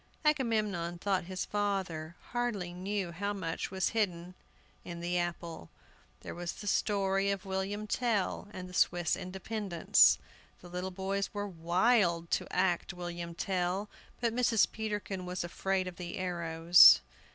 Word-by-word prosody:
Agamemnon 215 - +1
thought 190 0 0
his 185 +1 -4
father 190 -6 -2 0.2
hardly 230 -8 -2
knew 190 0 -3
how 200 +4 -2
much 165 -5 -3
was 190 -1 0
hidden 180 -5 -1 0.5
in 170 -1 -7
the 175 +1 -2
apple. 170 - -3 0.5
There - - -7
was 175 0 -4
all - - -16
the - - -8
story 195 -1 +1
of 200 0 -2
William 195 +2 -3
Tell 215 -4 -1
and 185 -3 -7
the 180 - -12
Swiss 175 -1 +2
independence. 190 0 +2 0.4
The 180 - -13
little 180 +1 -3
boys 195 +1 -2
were 205 0 -2
wild 175 0 +2
to - - -1
act 180 -1 0
William 175 -1 -6
Tell, 185 +2 -1 0.3
but 235 -1 0
Mrs. 235 -3 +3
Peterkin 205 -4 -4
was 180 0 -3
afraid 185 +2 -1
of 180 - -7
the 175 -1 -6
arrows. 170 -1 +6
185 Hz, 145 wpm, -31 LUFS, 175-205 Hz, 0.5 s, arrows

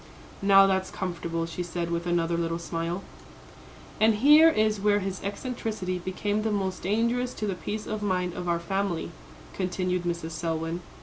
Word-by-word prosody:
"Now, 195 0 +7
that's 190 -1 +1
comfortable," 170 -3 -3
she 165 +2 -5
said, 170 -1 -3
with 170 +1 -2
another 170 -1 +1
little 165 0 -1
smile. 170 +2 -3 1.0
"And 220 0 +5
here 300 +8 +7
is 215 -8 +1
where 205 0 +4
his 195 -2 -3
eccentricity 205 -3 -3
became 205 +4 -2
the 220 - 0
most 190 -3 -1
dangerous 235 +5 0
to 215 - -3
the 200 - -1
peace 205 +5 -5
of 215 -1 -4
mind 180 -3 0
of 180 -1 -4
our 170 0 +1
family," 190 -1 -2 0.4
continued 180 -1 -1
Mrs. 170 -2 -3
Selwyn. 165 +1 -2
185 Hz, 165 wpm, -27 LUFS, 170-210 Hz, 1.0 s, Now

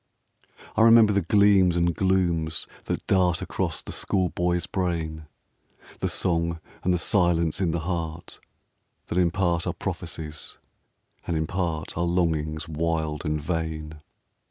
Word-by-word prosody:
I - - +3
remember 115 -2 +7
the 100 - +2
gleams 95 -1 +4
and 85 0 +2
glooms 85 -4 +1 0.2
that - - -3
dart 90 -3 +3
Across - - -2
the - - -7
school 95 -2 0
boy's 90 -1 0
brain; 80 -4 -3 0.7
The - - -1
song 85 -1 0 0.2
and 90 - +2
the 90 - +3
silence 85 -2 +2
in 90 - +2
the 85 0 -1
heart, 85 -1 -4 0.7
That 90 - +1
in 90 -1 +4
part 85 -2 0
are - - 0
prophecies, 75 -1 -5 0.7
and 85 - 0
in 80 - 0
part 85 -2 -3
Are 85 - 0
longings 80 -3 0
wild 80 -1 -2
and 75 0 0
vain. 80 -1 -4
85 Hz, 140 wpm, -25 LUFS, 80-90 Hz, 0.7 s, remember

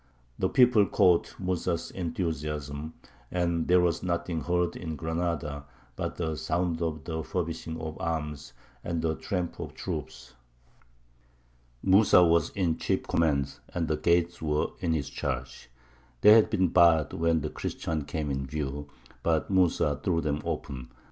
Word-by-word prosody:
The - - +1
people 120 -5 +5
caught 90 -2 +3
Mūsa's 90 -2 -2
enthusiasm, 75 -4 -4 0.3
and 85 -2 0
there 90 0 +5
was 85 -2 +1
nothing 85 -2 -2
heard 90 0 0
in 80 -3 -5
Granada 80 -2 -3 0.3
but - - -3
the 80 -2 -2
sound 85 0 -1
of 80 -2 -2
the 80 -1 -3
furbishing 80 -1 -4
of 80 +2 -6
arms 75 -4 -3 0.3
and 85 -2 -2
the 80 -1 +1
tramp 90 +1 -3
of - - -6
troops. - - -6 1.5
Mūsa 95 -2 +6
was 85 0 +3
in 85 -5 +1
chief - - 0
command, 70 -4 0 0.2
and 85 -2 0
the 80 - 0
gates 85 +2 +1
were 75 -1 0
in 85 -2 0
his 75 -4 -1
charge. 65 -3 -5 0.5
They 105 - +8
had 110 0 +7
been 95 -2 +2
barred 80 -4 +5
when 80 -1 +1
the - - -3
Christians 80 -3 -3
came 75 -1 -2
in 70 -1 -2
view; 70 0 -4 0.3
but 80 +2 0
Mūsa 85 -5 +2
threw 85 -3 +1
them 75 -2 -1
open. 65 -3 -5
80 Hz, 150 wpm, -28 LUFS, 75-90 Hz, 1.5 s, They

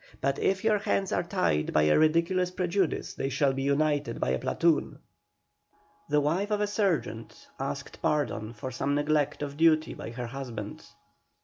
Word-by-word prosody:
But 140 0 0
if 190 0 +1
your 215 -2 +3
hands 195 -1 0
are - - +1
tied 80 - 0
by 75 - +4
a 75 0 +4
ridiculous 170 +4 +2
prejudice 180 -1 -1
they 135 - -2
shall 140 0 +2
be 135 +1 -2
untied 145 0 +1
by - - 0
a 65 +1 0
platoon." 165 -3 +1 1.1
The 150 0 +3
wife 170 +8 0
of 210 -1 0
a 210 - +2
sergeant 195 - -2
asked - - -5
pardon 115 -7 -1
for 130 +4 -6
some 140 +3 -1
neglect 145 0 +1
of 140 0 -6
duty 160 -1 +3
by - - -7
her 120 +1 -5
husband. 115 -4 -6
150 Hz, 170 wpm, -28 LUFS, 130-175 Hz, 1.1 s, by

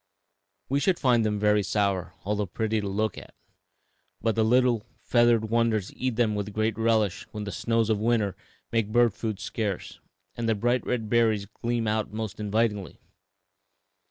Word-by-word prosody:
We 140 +2 +1
should 180 +4 +2
find 120 -4 +3
them 105 -1 0
very 105 0 +3
sour, 100 -2 -1
although 105 0 -1
pretty 110 +4 -1
to 100 - -4
look 110 +3 -1
at; - - -15 0.8
but 115 0 +1
the 110 - +2
little 120 -1 +3 0.2
feathered 120 -2 +3
wanderers 115 -4 +1
eat 130 -2 -2
them 110 -2 +2
with 105 0 -3
great 110 0 +1
relish 110 -3 +1
when 105 -1 -6
the 100 - -5
snows 115 0 0
of 105 - +1
winter 110 -4 +1 0.4
make 115 -3 +1
bird 120 -2 +4
food 110 -3 -4
scarce 105 -2 -4 0.4
and 115 -1 -2
the 110 - +3
bright 120 +4 +1
red 115 -3 -1
berries 110 -3 +2
gleam 115 +2 -2
out 110 -1 -1
most 110 -2 -5
invitingly. 105 -1 -1
110 Hz, 165 wpm, -27 LUFS, 105-115 Hz, 0.8 s, bird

